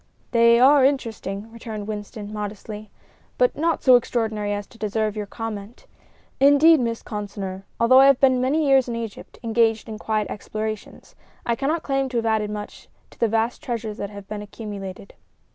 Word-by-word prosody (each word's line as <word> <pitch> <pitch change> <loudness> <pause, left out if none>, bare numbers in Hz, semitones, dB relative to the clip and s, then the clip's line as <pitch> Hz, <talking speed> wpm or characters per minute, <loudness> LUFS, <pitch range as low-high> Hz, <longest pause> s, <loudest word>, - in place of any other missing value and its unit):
"They 235 0 +5
are 275 +2 +6
interesting," 225 -6 -1
returned 220 -3 -7
Winston, 210 0 -6
modestly, 210 0 -6 0.5
"but - - +3
not 330 +2 0
so 255 -2 +7
extraordinary 220 -4 0
as 205 0 -3
to 230 - -19
deserve 215 0 -1
your 210 -1 -4
comment. 220 0 -7 0.5
Indeed, 285 +3 +6
Miss 230 -2 -2
Consinor, 200 -2 -6
although 255 +3 +6
I 270 - +8
have 275 -2 +5
been 260 -2 +4
many 295 +5 +1
years 270 -2 +4
in 235 - -2
Egypt, 230 -3 -7
engaged 225 -1 +1
in 215 -1 -7
quiet 215 -1 -1
explorations, 215 0 -6 0.3
I 235 - +1
cannot 300 +7 -1
claim 270 -1 0
to 245 - -2
have 230 - 0
added 220 -2 +1
much 210 0 -7 0.2
to - - -19
the 230 - +3
vast 225 +2 0
treasures 230 -6 -4
that 200 - -4
have 200 -1 -10
been 210 0 -5
accumulated." 200 -3 -8
225 Hz, 175 wpm, -23 LUFS, 210-250 Hz, 0.5 s, I